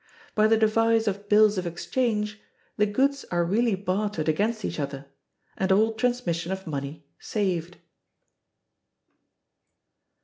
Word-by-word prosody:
By 215 0 +4
the 225 0 +4
device 225 +1 +3
of 205 0 -3
bills 210 -1 +5
of 180 - -3
exchange 210 +3 -2 0.3
the 210 - +2
goods 275 +6 +1
are 175 -1 +1
really 220 +4 +2
bartered 190 -3 -2
against 215 +8 0
each - - -4
other, 140 -1 -4 0.5
and 190 0 0
all 220 +3 +4
transmission 220 -8 -1
of 190 0 -4
money 145 0 -5
saved. 180 -5 -2
205 Hz, 125 wpm, -26 LUFS, 175-220 Hz, 0.5 s, bills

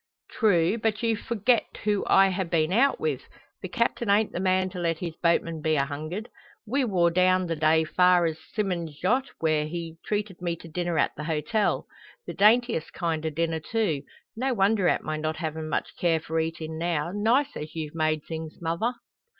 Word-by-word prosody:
"True; 200 -2 +2
but 220 0 -1
you 230 -1 +2
forget 235 +1 0
who 210 -1 +1
I 195 0 +5
ha' 185 -2 -2
been 160 +1 +1
out 270 +6 +3
with. 145 -4 -1 0.4
The - - -4
captain 235 -2 -1
ain't 205 +2 +3
the - - -4
man 185 0 +1
to 180 - -6
let 165 -2 0
his 165 -2 -5
boatman 165 -1 +1
be 155 0 +1
a 140 -2 +2
hungered. 155 +10 -5 0.4
We 265 +5 0
war 175 -6 +2
down 185 +1 +3
the 165 -1 -2
day 155 +1 +3
far 180 +2 +4
as 160 -1 -2 0.2
Symond's 175 -8 -2
yat, 250 +8 +2 0.2
where 155 -2 +1
he 165 0 -6
treated 205 -3 -3
me 170 -1 -1
to 170 - -13
dinner 175 0 -2
at - - +1
the 150 - -6
hotel. 160 +7 0 0.4
The - - -5
daintiest 225 -3 +3
kind 165 -2 -2
o' 160 - 0
dinner, 160 +1 -1
too. 165 -4 -1 0.3
No 255 +2 -1
wonder 200 -1 +3
at - - +1
my 155 0 -3
not 155 +1 -2
havin' 160 -1 -4
much - - -2
care 165 -2 +2
for 160 +1 -2
eatin' 160 0 -3
now 170 -1 -1
nice 245 +8 +2
as 155 +1 -7
you've 155 -2 -4
made 155 -2 0
things, 160 -1 -7
mother." 170 +9 -1
170 Hz, 195 wpm, -26 LUFS, 160-205 Hz, 0.4 s, I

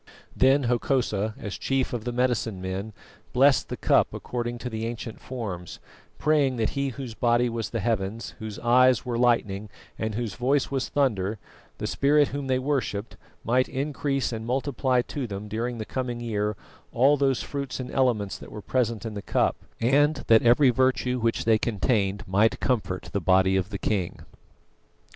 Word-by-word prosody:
Then 135 +2 +4
Hokosa, 120 -4 0
as 105 - -6
chief 135 -1 0
of 120 -2 -4
the 120 - -1
medicine 120 -5 0
men, 95 +3 -4 0.4
blessed 135 +1 +4
the - - -4
cup - - +2
according 120 -1 -4
to 120 - -6
the 110 -1 -3
ancient 115 -1 -6
forms, 100 -9 -6 0.4
praying 145 -4 +2
that 115 -2 0
he 140 0 -1
whose 130 -2 -7
body 120 +1 +2
was 115 -4 -3
the 115 - -3
heavens, 110 0 -2
whose 110 -2 -6
eyes 125 +1 +4
were 120 -2 -2
lightning, 105 -4 +1 0.3
and 110 -1 -2
whose 115 -3 -3
voice 135 +3 +1
was 135 -2 -1
thunder, 110 -7 0 0.4
the - - -4
spirit 145 +1 +3
whom 140 0 -4
they 130 -1 +2
worshipped, 130 -6 -2 0.3
might 125 +3 +2
increase 135 -1 -1
and 110 0 -4
multiply 130 -1 +1
to 135 -1 -4
them 100 0 -6
during 115 +3 -3
the 110 - -4
coming 125 -1 -3
year 105 -3 -1 0.4
all 135 +4 +4
those 135 -2 +1
fruits 140 -2 -4
and 130 - -5
elements 115 -7 +1
that - - -11
were 105 - -8
present 115 -3 -1
in 110 - -4
the 100 - -5
cup, - - +1 0.2
and 140 +4 +3
that 115 -1 +6
every 125 +3 +5
virtue 125 0 +1
which 115 -1 0
they 110 -1 +4
contained 105 -2 0
might 105 +4 +2
comfort 110 -8 -1
the 100 - 0
body 95 +2 +4
of 95 0 0
the 105 - -4
king. 95 -3 -2
120 Hz, 175 wpm, -26 LUFS, 105-130 Hz, 0.4 s, that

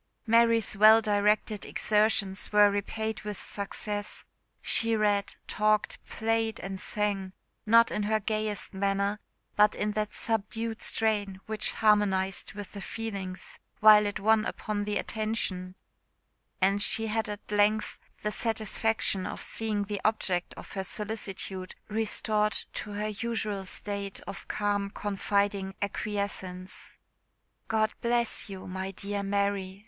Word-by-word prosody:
Mary's 230 -1 +4
well 215 +2 +8
directed 210 0 +1
exertions 210 -2 +1
were 210 -1 +6
repaid 220 +2 -2
with 210 -2 -5
success; 205 0 -4 0.3
she 225 0 +3
read, 205 -2 +1
talked, 215 0 +1
played, 225 0 0
and 195 -1 -5
sang, 200 -3 -1 0.3
not 230 +1 +6
in - - -1
her 215 +1 +1
gayest 215 0 -2
manner, 200 +1 0 0.4
but 210 0 +5
in 210 0 -1
that 210 0 -1
subdued 225 +1 -1
strain 205 -4 +1
which 215 -1 0
harmonised 195 -3 +2
with 205 -1 -7
the 200 - -7
feelings, 195 -5 -6 0.2
while 210 -1 +8
it 205 - -3
won 220 +1 +4
upon 210 -1 -3
the 210 0 0
attention, 210 -5 -1 0.8
and 195 +2 +3
she 225 +2 +2
had 220 0 -1
at 205 0 -7
length 210 +1 +2 0.2
the 210 - 0
satisfaction 220 -3 0
of - - -5
seeing 215 -2 -1
the 200 -1 -4
object 190 -5 0
of - - -11
her 195 - -3
solicitude 195 -2 -4
restored 215 0 +1 0.2
to 205 - -4
her 210 +1 -2
usual 215 -3 -2
state 200 0 -4
of - - -8
calm 205 -1 0
confiding 200 -1 -1
acquiescence. 200 -3 -4 0.7
"God 220 -1 +2
bless 235 -2 0
you, 190 -1 -7
my 190 +1 -4
dear 200 +1 -4
Mary!" 200 -1 -1
210 Hz, 130 wpm, -29 LUFS, 200-215 Hz, 0.8 s, well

